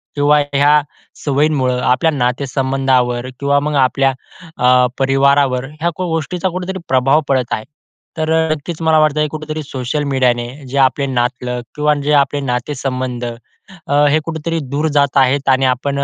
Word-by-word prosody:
किंवा 145 +1 +3
ह्या 145 +2 +4 0.4
सवयींमुळं, 140 -3 +1
आपल्या 130 +7 +2
नाते-संबंधावर 130 -1 0
किंवा 140 0 +2
मग 150 +1 -2
आपल्या 135 +1 +1 0.4
अ, 125 0 +4
परिवारावर 135 -1 +2 0.2
ह्या 170 - +2
क - - -5
गोष्टीचा 175 +2 -2
कुठेतरी 185 +2 -5
प्रभाव 135 +4 +3
पडत 130 -3 0
आहे. 110 - -3 0.5
तर 160 0 -1
अ, 160 0 +2
नक्कीच 155 +2 -4
मला 160 -1 +3
वाटतं 150 0 +2
कुठेतरी 155 0 -5
सोशल 135 +1 -3
मीडियाने 120 -2 +1 0.2
जे 135 - -4
आपले 135 +1 +2
नातलग 125 -1 -2
किंवा 150 0 +2
जे 150 - +1
आपले 145 0 +2
नाते-संबंध 130 -1 -3 0.6
अ, 140 - -1 0.2
हे 155 +2 +3
कुठेतरी 165 0 -3
दूर 150 +3 -1
जात 140 -1 +2
आहेत, 135 +1 +2
आणि 130 0 +3
आपण 135 +2 0
140 Hz, 150 wpm, -16 LUFS, 130-150 Hz, 0.6 s, ह्या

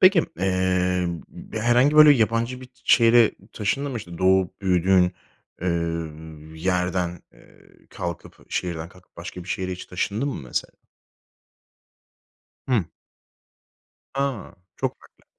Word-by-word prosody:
Peki, 185 -1 +7 0.2
emm, 90 -2 +1
b - - -13
b 110 - -2
herhangi 125 +6 +4
böyle 150 -1 +10
yabancı 115 +1 +1
bir 130 - -10
t 125 - -34
şehre 115 -1 +6 0.2
taşındın 135 +7 -1
mı? 120 - -3
İşte, 85 -5 -9
doğup 95 0 +2
büyüdüğün, 90 -1 +3 0.5
eee, 90 - 0 0.9
yerden, 90 -1 0
eee, - - -21 0.2
kalkıp, 85 -3 -7
şehirden 85 -2 -3
kalkıp 90 0 -21
başka 90 +1 -7
bir - - -13
şehre 95 -1 -2
hiç 90 - -7
taşındın 105 +9 -2
mı, 135 - -4
mesela? 65 - -3 2.0
Hıı. 120 -7 +3 1.3
A, 135 -5 -2 0.2
çok - - -2
farklı. - - -23
95 Hz, 125 wpm, -24 LUFS, 90-120 Hz, 2.0 s, böyle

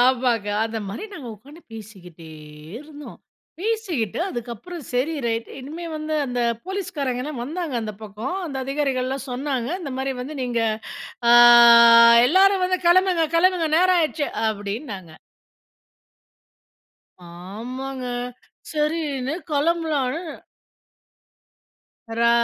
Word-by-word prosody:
ஆமாங்க. 245 -4 +2 0.2
அந்த 225 0 -4
மாரி 225 - -6
நாங்க 270 -8 -8
உட்கார்ந்து 285 - -16
பேசிக்கிட்டே 185 -7 -12 0.5
இருந்தோம். 295 0 -12 0.4
பேசிக்கிட்டு 375 - -2
அதுக்கப்புறம் 245 - -7
செரி 260 +6 0
ரைட் 230 0 -2
இனிமே 310 +6 -8
வந்து 310 0 -4
அந்த 245 -1 -4 0.3
போலீஸ்காரங்கள்லாம் 300 -9 -4
வந்தாங்க 320 -1 -4
அந்த 215 -1 -5
பக்கம் 220 - -5
அந்த 275 -4 -6
அதிகாரிகள்லாம் 270 -1 -2
சொன்னாங்க, 255 -1 -3
இந்த 280 -6 -6
மாரி 270 0 -2
வந்து 295 +4 -7
நீங்க 240 -2 -1 0.7
ஆ, - - +6 1.0
"எல்லாரும் 380 +3 +4
வந்து 370 0 0
கெளம்புங்க, 355 -2 +4
கெளம்புங்க. 350 -1 +2
நேரம் 365 +1 +4
ஆயிடுச்சு"அப்டின்னாங்க. 215 - -3 2.4
ஆமாங்க. 255 +3 -6 0.7
சரின்னு 300 -3 -2 0.2
கெளம்பலான்னு 310 -1 0 2.0
ரா 235 - +4
275 Hz, 95 wpm, -22 LUFS, 240-330 Hz, 2.4 s, ஆ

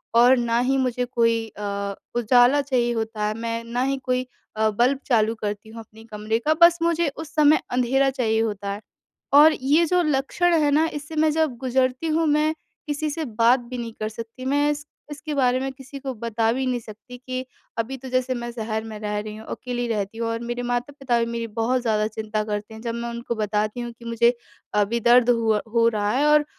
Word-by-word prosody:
और 245 +2 +7
ना 235 0 +1
ही 265 +2 +1
मुझे 250 -1 0
कोई 230 -2 +1
अ, 200 -1 -3 0.2
उजाला 245 +4 +4
चाहिए 255 -3 0
होता 220 -1 -3
है 215 - -1
मैं 230 0 -3
ना 235 +2 -3
ही 270 +1 0
कोई 255 0 -1 0.3
अ, 220 0 +3
बल्ब 245 +6 +2
चालू 225 -3 +2
करती 210 0 -5
हूँ 225 +1 -10
अपने 220 0 -16
कमरे 215 +2 -1
का। 310 - +5
बस 340 0 +7
मुझे 335 0 +2
उस 320 -1 -8
समय 305 0 +5
अँधेरा 260 +2 +2
चाहिए 225 -4 0
होता 205 -3 -2
है। 205 - -7 0.5
और 305 +2 +8
ये 295 +6 +4
जो 360 +2 +2
लक्षण 305 +4 +1
है 295 - +3
ना, 310 +3 +4
इससे 295 +1 -7
मैं 310 0 +3
जब 310 -5 0
गुज़रती 255 +3 0
हूँ 320 +1 +1
मैं 300 +1 +2 0.3
किसी 300 +1 -2
से 320 +2 -3
बात 235 +1 +3
भी 245 +1 -8
नहीं 230 -2 -5
कर 215 0 -2
सकती। 230 +3 -9
मैं 290 +2 +2 0.4
इसके 300 +1 -6
बारे 255 -2 +2
में 270 0 -3
किसी 270 +1 -10
को 270 -1 -4
बता 225 -1 0
भी 265 +1 -1
नहीं 250 -1 0
सकती। 230 +3 -12
कि 255 +1 -5 0.3
अभी 240 +4 -2
तो 260 0 -9
जैसे 255 0 0
मैं 240 0 -5
शहर 220 -2 -3
में 220 -1 -7
रह 210 -1 -3
रही 210 0 -6
हूँ 220 - -11
अकेली 245 -1 -3
रहती 210 -1 -3
हूँ 230 - -1
और 230 0 -2
मेरे 240 +1 -4
माता-पिता 245 +1 -1
भी 230 - +1
मेरी 230 0 -3
बहुत 230 +3 0
ज़्यादा 215 -2 +1
चिंता 215 0 -3
करते 210 +1 -4
हैं। 220 - -10
जब 235 -1 -3
मैं 235 0 -4
उनको 235 0 -4
बताती 210 +1 -1
हूँ 240 - -5
कि 235 - -13
मुझे 235 +1 +3 0.5
अभी 230 +4 0
दर्द 240 +1 +5
हुआ 225 -3 +2
हो 230 -1 +4
रहा 210 -2 -1
है 275 +5 +2
और 300 0 +5
240 Hz, 215 wpm, -23 LUFS, 225-270 Hz, 0.5 s, और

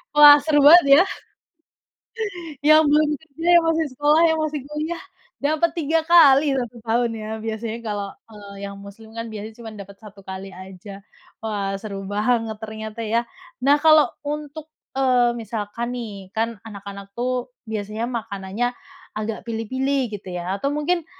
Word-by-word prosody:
Wah, 295 -1 +10
seru 300 -1 +3
banget 340 -1 +9
ya? - - +6 1.6
Yang 310 +1 +7
belum 300 0 +4
kerja, 315 +1 -9
yang 340 - +3
masih 325 -1 +1
sekolah, 295 +4 +3
yang 320 -1 +2
masih 305 -1 -2
kuliah, 310 +3 -4 0.4
dapat 310 +3 +1
3 320 +1 +1 0.6
kali 240 -2 -4
tahun 235 +1 0
ya, 215 - -6 0.2
biasanya 225 0 -4
kalau 205 -2 -3 0.2
kalau 205 -2 -13
yang 200 0 -6
Muslim 220 +2 -13
kan, 230 0 -5
biasa 215 0 -7
cuma 225 - -7
dapat 200 0 -10
1 205 -2 -13
kali 190 +1 -7
aja. 190 +2 -11 0.4
Wah 200 -2 -2
seru 195 -1 -7
banget 220 +1 0
ternyata 220 +1 -7
ya. 230 +2 0 0.3
Nah 280 +3 +5
kalau 310 0 +5 0.2
untuk, 300 +1 -6 0.2
eee, 245 -3 +3
misalkan 230 +1 -4
nih, 200 -6 -7
kan 225 0 -1
anak-anak 200 -1 -9
tuh, 250 +1 -3 0.2
biasanya 215 +2 -3
makanannya 225 0 -3 0.4
agak 215 +1 -4
pilih-pilih 260 +3 -1
gitu 185 -2 -10
ya, 180 +2 -3
atau 280 +7 -1
mungkin 315 +3 0
230 Hz, 145 wpm, -22 LUFS, 205-290 Hz, 1.6 s, Wah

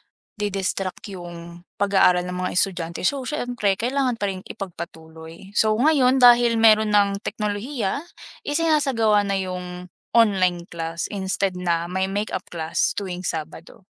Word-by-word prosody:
nadi-distract 195 -3 -3
yung 170 -1 -9 0.2
pag-aaral 190 -3 +3
ng 180 0 -5
mga - - -3
estudyante. 170 -3 -1
So 280 +5 +1
siyempre 245 -9 -1
kailangan 250 +1 0
pa 200 -2 -1
rin 185 - -8
ipagpatuloy. 165 0 -9
So 215 0 +4
ngayon 265 -1 +4
dahil 240 -1 +6
meron 215 -1 +5
ng 200 -1 +3
teknolohiya, 210 +4 -3 0.4
isinasagawa 280 -9 +2
na 200 -1 0
yung 185 -1 -4 0.5
online 185 -6 +3
class 165 0 -4
instead 195 -1 -1
na 170 -2 0
may 190 +1 0
makeup 205 +2 -3
class 160 -1 0
tuwing 185 -3 -4
Sabado. 160 +3 -6
195 Hz, 130 wpm, -23 LUFS, 180-225 Hz, 0.5 s, dahil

